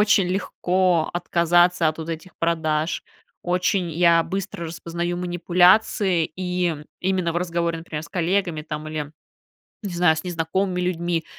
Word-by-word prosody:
очень 210 Hz, -3 st, +4 dB
легко 180 Hz, -2 st, +1 dB
отказаться 175 Hz, 0 st, +3 dB
от 155 Hz, +1 st, -4 dB
вот 160 Hz, +1 st, -6 dB
этих 165 Hz, +3 st, -7 dB
продаж. 160 Hz, -1 st, 0 dB, 0.4 s
Очень 180 Hz, 0 st, 0 dB
я 170 Hz, 0 st, +4 dB
быстро 195 Hz, -1 st, -4 dB
распознаю 170 Hz, +1 st, -4 dB
манипуляции, 180 Hz, +1 st, +3 dB
и 180 Hz, -2 st, -1 dB, 0.2 s
именно 185 Hz, -2 st, 0 dB
в -, -, -3 dB
разговоре, 170 Hz, -1 st, -1 dB
например, 160 Hz, -2 st, -6 dB
с -, -, -11 dB
коллегами, 175 Hz, -3 st, 0 dB
там, 155 Hz, 0 st, -6 dB
или 150 Hz, -1 st, -5 dB, 0.7 s
не 195 Hz, -3 st, -4 dB
знаю, 170 Hz, -2 st, +4 dB
с 160 Hz, -, -5 dB
незнакомыми 180 Hz, +2 st, -1 dB
людьми, 175 Hz, -2 st, -1 dB
175 Hz, 135 wpm, -23 LUFS, 165-180 Hz, 0.7 s, очень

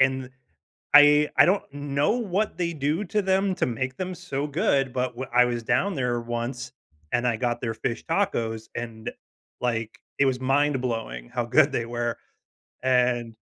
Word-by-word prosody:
and 130 Hz, 0 st, +3 dB
th 130 Hz, -, -14 dB, 0.6 s
I 150 Hz, 0 st, +8 dB
I -, -, +8 dB
don't 195 Hz, +3 st, +2 dB
know 145 Hz, +3 st, 0 dB
what 210 Hz, -4 st, -1 dB
they 170 Hz, -1 st, -1 dB
do 155 Hz, +6 st, -1 dB
to 210 Hz, +3 st, 0 dB
them 190 Hz, 0 st, +1 dB
to -, -, +1 dB
make 130 Hz, +2 st, -3 dB
them 185 Hz, 0 st, -4 dB
so 150 Hz, -5 st, -4 dB
good, 140 Hz, -3 st, +1 dB
but 125 Hz, -1 st, -1 dB
w 130 Hz, +1 st, -4 dB
I 125 Hz, 0 st, +6 dB
was 120 Hz, -1 st, -2 dB
down 190 Hz, -, +1 dB
there 125 Hz, -3 st, -1 dB
once, 120 Hz, +2 st, -4 dB, 0.4 s
and 120 Hz, +1 st, +1 dB
I 115 Hz, -2 st, +1 dB
got 120 Hz, 0 st, -1 dB
their 115 Hz, -2 st, -2 dB
fish 115 Hz, +1 st, -4 dB
tacos, 115 Hz, -, -1 dB
and, 115 Hz, -2 st, -5 dB, 0.5 s
like, 115 Hz, -3 st, -2 dB, 0.2 s
it 140 Hz, -, +4 dB
was 130 Hz, -1 st, 0 dB
mind-blowing 130 Hz, -, 0 dB
how 120 Hz, -, -2 dB
good 140 Hz, +4 st, +4 dB
they 115 Hz, -3 st, -1 dB
were, 120 Hz, 0 st, -3 dB, 0.7 s
and, 125 Hz, -3 st, +1 dB
130 Hz, 175 wpm, -25 LUFS, 120-150 Hz, 0.7 s, I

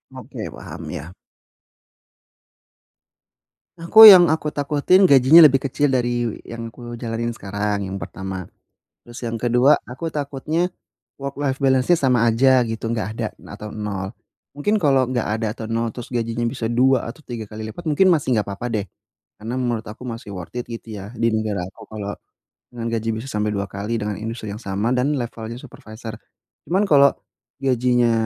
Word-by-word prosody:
Oke, -, -, -9 dB
paham, -, -, -9 dB
ya. 80 Hz, +6 st, -7 dB, 2.6 s
Aku, 170 Hz, +6 st, +3 dB
yang 180 Hz, -3 st, +9 dB
aku 155 Hz, -1 st, -2 dB
takutin 150 Hz, +7 st, +3 dB
gajinya 145 Hz, +2 st, +8 dB
lebih 135 Hz, -2 st, +4 dB
kecil 145 Hz, 0 st, +1 dB
dari 120 Hz, -2 st, -1 dB
yang 115 Hz, -1 st, -7 dB
aku 120 Hz, 0 st, -9 dB
jalanin 115 Hz, 0 st, -3 dB
sekarang, 100 Hz, 0 st, -3 dB
yang 95 Hz, +1 st, -5 dB
pertama. 95 Hz, -2 st, -6 dB, 0.6 s
Terus 120 Hz, 0 st, -10 dB
yang 115 Hz, 0 st, -3 dB
ke-2, 125 Hz, +4 st, +4 dB
aku 150 Hz, +6 st, -5 dB
takutnya, 150 Hz, +4 st, -2 dB, 0.5 s
work-life 140 Hz, 0 st, -3 dB
balance-nya 135 Hz, +4 st, +3 dB
sama 125 Hz, -3 st, +3 dB
aja 130 Hz, +3 st, +4 dB
gitu, 115 Hz, 0 st, -5 dB
enggak 110 Hz, -4 st, -2 dB
ada 115 Hz, -, -2 dB, 0.3 s
atau 105 Hz, -1 st, -8 dB
0. 100 Hz, -2 st, -4 dB, 0.4 s
Mungkin 205 Hz, +9 st, 0 dB
kalau 135 Hz, -7 st, +2 dB
enggak 125 Hz, -3 st, -1 dB
ada 110 Hz, -, -1 dB
atau 110 Hz, -, -7 dB
0 115 Hz, 0 st, -1 dB
terus 125 Hz, +2 st, -9 dB
gajinya 115 Hz, 0 st, -1 dB
bisa 115 Hz, 0 st, -3 dB
2 125 Hz, 0 st, +2 dB
atau 155 Hz, +5 st, -14 dB
3 120 Hz, -3 st, -5 dB
kali 110 Hz, 0 st, -6 dB
lipat, 175 Hz, +5 st, -11 dB
mungkin 190 Hz, +6 st, +4 dB
masih 150 Hz, -5 st, 0 dB
enggak 105 Hz, -, 0 dB
apa-apa 100 Hz, +4 st, -5 dB
deh. 100 Hz, -2 st, -1 dB, 0.5 s
Karena 115 Hz, +4 st, -5 dB
menurut 120 Hz, -3 st, -2 dB
aku 110 Hz, +4 st, -10 dB
masih 115 Hz, -3 st, -7 dB
worth 90 Hz, +5 st, -9 dB
it 120 Hz, -, -4 dB
gitu 115 Hz, -2 st, -7 dB
ya 100 Hz, +2 st, -8 dB
di 115 Hz, 0 st, +1 dB
negara 105 Hz, -4 st, -1 dB
aku -, -, -15 dB
kalau 105 Hz, -2 st, -5 dB, 0.6 s
dengan 115 Hz, -1 st, -4 dB
gaji 115 Hz, 0 st, -2 dB
bisa 115 Hz, +5 st, -6 dB
sampai 105 Hz, 0 st, -1 dB
2 100 Hz, -1 st, -3 dB
kali 105 Hz, +4 st, -3 dB
dengan 105 Hz, -2 st, -3 dB
industri 110 Hz, 0 st, -6 dB
yang 105 Hz, -, -8 dB
sama 100 Hz, +4 st, -1 dB
dan 135 Hz, +4 st, +1 dB
levelnya 115 Hz, -2 st, -5 dB
supervisor. 110 Hz, -4 st, -10 dB, 0.5 s
Cuman 190 Hz, +4 st, +2 dB
kalau, 140 Hz, -3 st, +6 dB, 0.5 s
gajinya 125 Hz, -2 st, +2 dB
120 Hz, 165 wpm, -21 LUFS, 110-135 Hz, 2.6 s, yang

